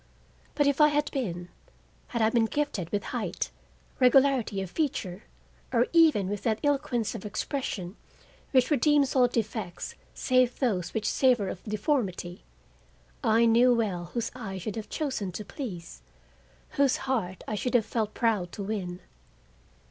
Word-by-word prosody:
But 290 - +3
if 285 +1 +2
I 300 - +9
had 295 0 0
been; 175 -10 -3 0.6
had 235 -2 -1
I 220 - +3
been 230 -1 +3
gifted 255 - -2
with 205 -1 -1
height, 210 - -2 0.5
regularity 255 -4 +4
of 190 -2 -4
feature, 215 - -2 0.5
or 240 -1 +3
even 315 - +5
with 205 0 -3
that 220 -2 0
eloquence 275 -6 0
of 225 - -7
expression 210 - -3 0.5
which 255 +2 +3
redeems 290 0 +3
all 250 -2 +6
defects 220 -6 -3 0.2
save 255 -1 +2
those 195 -10 -1
which 215 -1 -1
savor 245 -7 +3
of 185 - -6
deformity, 205 - -2 0.8
I 230 0 +4
knew 240 +2 +5
well 195 -7 -1
whose 230 +6 -3
eye 220 -6 -6
I - - -4
should 195 +3 -5
have 220 -1 -6
chosen 260 - -2
to 210 - -6
please, 180 - -7 0.7
whose 275 -2 +2
heart 205 -9 -2
I - - -3
should 245 +5 -1
have 225 -3 +4
felt 220 -2 -2
proud 215 -7 +1
to 200 - -5
win. 190 -4 -4
225 Hz, 155 wpm, -28 LUFS, 195-260 Hz, 0.8 s, I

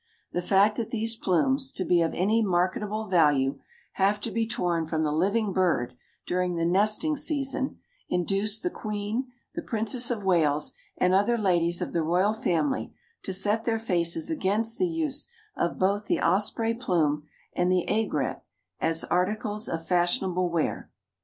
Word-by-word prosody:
The 175 - -1
fact 200 +3 +3
that 230 - -3
these 225 0 0
plumes, 265 - +1
to 185 - -2
be 175 -1 +3
of 165 - 0
any 215 +5 +2
marketable 205 +3 0
value, 145 -7 +2 0.3
have 200 +2 +1
to - - -3
be 230 -1 -1
torn 170 -6 -1
from 160 0 -1
the 150 - 0
living 200 +6 +1
bird 160 -10 +1 0.3
during 180 0 -1
the 165 0 0
nesting 215 - +2
season 275 -2 -1 0.3
induced 195 +4 0
the 355 - -1
Queen, 215 +3 -3 0.3
the 335 - -4
Princess 235 -1 +1
of 220 -5 -3
Wales, 155 -5 +2 0.2
and 180 0 +2
other 205 +5 +3
ladies 175 -5 +1
of - - -6
the 170 - +1
royal 180 +6 +2
family 225 - -1 0.3
to - - -5
set 205 +4 +1
their 225 -1 +1
faces 170 - 0
against 225 -5 0
the 365 - +2
use 315 - -2 0.2
of 170 - -1
both 200 +2 +1
the - - +1
osprey 215 +5 +1
plume 155 -10 0 0.3
and 180 +1 +1
the 180 -1 +2
aigrette 205 -11 -1 0.4
as 165 0 +1
articles 210 +4 -1
of 165 -1 -4
fashionable 180 0 +1
wear. 165 -2 -2
195 Hz, 160 wpm, -27 LUFS, 175-225 Hz, 0.4 s, fact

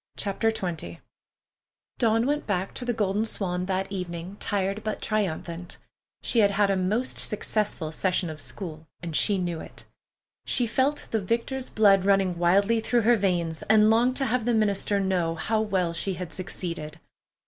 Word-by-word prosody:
CHAPTER 205 +3 0
XX 185 -7 -4 1.0
Dawn 225 -1 +3
went 295 +2 -1
back 190 -2 -1
to 250 - -4
the 245 - +1
Golden 210 -2 0
Swan 180 -4 -2
that 190 0 -1
evening 180 -1 -5
tired 200 +1 -1
but 215 - -3
triumphant. 175 -4 -2 0.5
She 235 - +1
had 205 -2 +6
had 200 0 +2
a - - +2
most 205 +7 +1
successful 210 -6 -1
session 180 +2 0
of 155 -1 -6
school, 160 -5 -8 0.2
and 165 -2 -4
she 205 +4 +3
knew 175 -3 -2
it. - - -11 0.6
She 245 - +1
felt 265 +5 0
the 220 - +1
victor's 235 +6 -2
blood 200 -3 +5
running 195 -3 +2
wildly 200 +6 +3
through 235 +2 +1
her 240 +2 +5
veins, 175 -6 0
and 215 0 +6
longed 240 +3 +3
to 270 - +1
have 240 -1 0
the 240 -1 +2
minister 205 -1 +1
know 180 -4 0
how 215 +6 0
well 185 -5 0
she 190 +3 -1
had 175 -1 -6
succeeded. 165 -4 -5
195 Hz, 170 wpm, -26 LUFS, 180-220 Hz, 1.0 s, had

